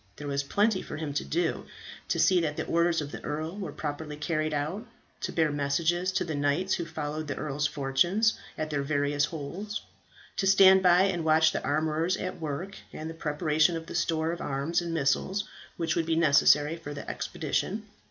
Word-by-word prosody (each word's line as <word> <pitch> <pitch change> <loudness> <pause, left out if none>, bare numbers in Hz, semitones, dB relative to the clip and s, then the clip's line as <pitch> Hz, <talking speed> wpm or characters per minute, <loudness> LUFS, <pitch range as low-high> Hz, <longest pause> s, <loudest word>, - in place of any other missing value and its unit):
There 145 - -7
was 140 0 0
plenty 200 +7 +1
for - - -7
him 155 -2 -4
to 145 - -1
do 350 - -1 0.4
to - - 0
see 185 -2 +4
that 150 -2 -2
the - - -2
orders 170 -1 +2
of 145 -1 -6
the - - -8
earl 155 +4 -3
were 185 -7 -4
properly 150 +1 -5
carried 155 0 -1
out; 155 - -3 0.3
to - - -3
bear 160 -2 +2
messages 165 +6 0
to - - +1
the 165 -3 -4
knights 145 +6 +1
who 170 - -1
followed 155 -1 -4
the 145 - -3
earl's 145 0 -1
fortunes, 175 +11 +2 0.2
at 155 0 -3
their 145 -1 0
various 145 0 +1
holds; 175 +9 -5 0.5
to 195 - +1
stand 190 -1 +7
by 180 0 +6
and 185 -4 0
watch 160 0 +4
the - - -3
armourers 155 +4 0
at 185 -2 -5
work, 160 +6 -4
and 160 +1 -6
the - - -8
preparation 155 +1 +1
of 165 - -7
the - - -8
stores 165 -1 0
of 170 - -6
arms 145 +6 0
and 170 -1 -4
missiles 165 +6 +1 0.3
which 165 -1 0
would 165 -1 0
be 165 - +2
necessary 150 -1 +4
for 145 -3 -7
the - - -7
expedition. 210 +3 -2
160 Hz, 200 wpm, -28 LUFS, 145-175 Hz, 0.5 s, stand